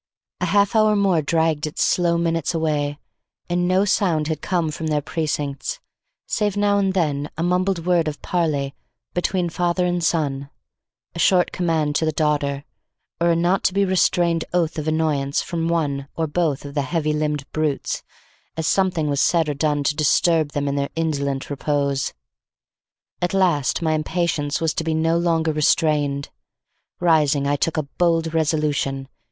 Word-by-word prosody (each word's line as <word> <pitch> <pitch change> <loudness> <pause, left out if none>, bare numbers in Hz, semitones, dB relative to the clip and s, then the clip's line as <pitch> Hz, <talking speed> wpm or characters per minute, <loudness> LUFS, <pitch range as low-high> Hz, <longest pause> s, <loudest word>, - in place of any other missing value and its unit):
A - - 0
half 200 +1 +2
hour 215 -1 +4
more 195 -5 +2
dragged 160 0 +1
its 155 - -1
slow 170 -1 +2
minutes 165 -1 0
away, 150 -3 -1 0.5
and 175 0 0
no 185 +2 +3
sound 170 -7 +1
had 155 -2 -2
come 170 -4 0
from 160 +1 -4
their 150 -1 +1
precincts 150 - -3 0.5
save 205 -1 -1
now 205 0 +3
and 195 -1 0
then 150 -5 0
a 165 - -1
mumbled 180 -1 0
word 175 -3 +2
of 150 -1 -4
parley 150 -6 -1 0.4
between 180 0 0
the 170 - -4
father 175 +1 +1
and 175 -1 -1
son, 140 -4 0 0.6
a 170 - -7
short 180 +1 +3
command 160 -4 0
to 160 - 0
the 155 - +1
daughter, 145 -2 0 0.6
or 170 0 +2
a 170 - +3
not 175 +3 +1
to 185 - +2
be 200 0 +3
restrained 175 -3 +2
oath 165 -3 0
of 155 - -5
annoyance 155 -3 0
from 165 -1 -2
one 145 -5 -1
or 165 - 0
both 155 -3 -1
of 140 - -7
the 145 - 0
heavy 155 +2 -1
limbed 150 -2 -1
brutes 155 -3 -1 0.6
as 160 - -2
something 180 -4 +1
was 145 -1 +1
said 165 -3 +2
or 150 - 0
done 145 0 0
to 145 - +1
disturb 155 0 +2
them 145 0 -1
in 140 - 0
their 140 0 -1
indolent 140 -4 -1
repose. 140 -1 -1 1.1
At 175 +2 0
last 170 -6 +1
my 160 -1 +2
impatience 155 -2 -1
was 160 -1 0
to - - -2
be 160 0 -1
no 165 +1 +2
longer 165 -2 +1
restrained. 145 -2 +1 0.7
Rising, 155 -5 +3
I 145 - +2
took 160 +3 -1
a 155 - +1
bold 165 +2 0
resolution. 150 -4 0
160 Hz, 170 wpm, -22 LUFS, 145-175 Hz, 1.1 s, hour